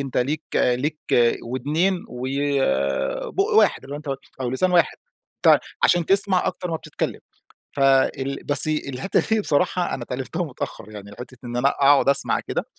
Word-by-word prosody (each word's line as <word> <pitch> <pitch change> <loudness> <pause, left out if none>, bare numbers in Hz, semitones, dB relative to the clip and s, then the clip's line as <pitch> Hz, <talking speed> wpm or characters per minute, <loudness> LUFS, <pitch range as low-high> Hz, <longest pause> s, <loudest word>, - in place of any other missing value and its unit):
"أنت 135 -2 -5
ليك 145 +5 -1
ليك 140 +5 0 0.4
ودْنين 150 +10 -1
وبُق 130 - -1
واحد. - - +3
اللي 140 - -8
هو - - -4
أنت 140 -3 -5 0.2
أو 125 - -2
لسان 180 +9 0
واحد، 175 - +2 0.5
ت - - +7 0.2
عشان 175 -2 +3
تسْمع 195 -1 +5
أكتر 180 -2 -4
ما 160 - -1
بتتكلم. - - -5 0.6
فال 135 0 +1
بس 145 +1 +5
الحتة 140 +1 -1
دي 220 -1 +2
بصراحة 180 +1 0
أنا 125 - -6
اتعلّمتها 130 +7 -4
متأخر 120 -7 -7
يعني، 100 -1 -10
حتة 125 +1 -10
إن 120 0 -5
أنا 135 +3 +3
أقعد 140 0 +3
أسْمع 140 0 +2
كده. - - -4
140 Hz, 155 wpm, -22 LUFS, 125-160 Hz, 0.6 s, ت